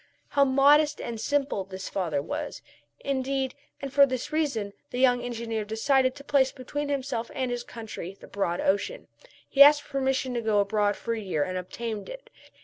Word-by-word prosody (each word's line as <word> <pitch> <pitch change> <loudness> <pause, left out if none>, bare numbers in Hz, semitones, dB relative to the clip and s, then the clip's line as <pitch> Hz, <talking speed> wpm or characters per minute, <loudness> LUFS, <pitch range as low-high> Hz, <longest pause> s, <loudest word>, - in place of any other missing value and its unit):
How 280 - +4
modest 290 +3 +4
and 230 -2 -5
simple 280 -8 0
this 190 0 -7
father 160 -7 -1
was, - - -5 0.4
indeed. 270 -1 -1 0.3
And 275 -1 -6
for 280 -1 +7
this 260 +3 -4
reason 240 -11 -1 0.2
the - - -5
young 250 -1 +4
engineer 230 -2 -3
decided 255 +5 +1
to 280 - -11
place 275 -2 +3
between 290 +2 -5
himself 265 -4 -2
and 260 -2 -1
his 240 0 -3
country 215 -6 -8
the - - -12
broad 180 -3 -2
ocean. 200 - -1 0.4
He 275 - +2
asked 290 +1 +9
permission 265 -2 -1
to 240 - -1
go 220 -2 +2
abroad 205 0 +1
for 230 - -3
a 225 - -3
year 185 -8 -1
and 185 +3 -4
obtained 210 +3 -5
it. - - -10
245 Hz, 180 wpm, -27 LUFS, 210-275 Hz, 0.4 s, asked